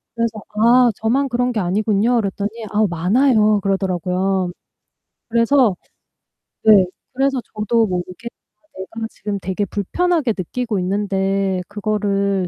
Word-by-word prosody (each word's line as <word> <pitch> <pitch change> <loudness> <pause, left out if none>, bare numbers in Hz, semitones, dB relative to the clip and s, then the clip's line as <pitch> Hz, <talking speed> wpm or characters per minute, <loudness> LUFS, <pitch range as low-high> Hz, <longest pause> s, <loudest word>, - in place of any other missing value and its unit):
그래서 230 -2 -1
"아 235 +3 +4
저만 260 +5 0
그런 245 +1 0
게 220 - -1
아니군요." 210 +5 +1
그랬더니 205 -1 -1 0.2
"아 215 +1 +2
많아요." 215 +4 +3
그러더라고요. 185 -1 -1 0.8
그래서 230 -3 +3 0.9
네 205 -4 +7 0.3
그래서 270 0 +1 0.2
저도 220 +1 +1
모르게 180 +4 -5 0.3
아 - - -35 0.3
내가 225 - -3
지금 205 -1 -5
되게 190 +2 -2
불편하게 300 - 0
느끼고 215 +3 -3
있는데 195 0 0
그거를 200 -2 -1
210 Hz, 285 characters per minute, -19 LUFS, 195-235 Hz, 0.9 s, 네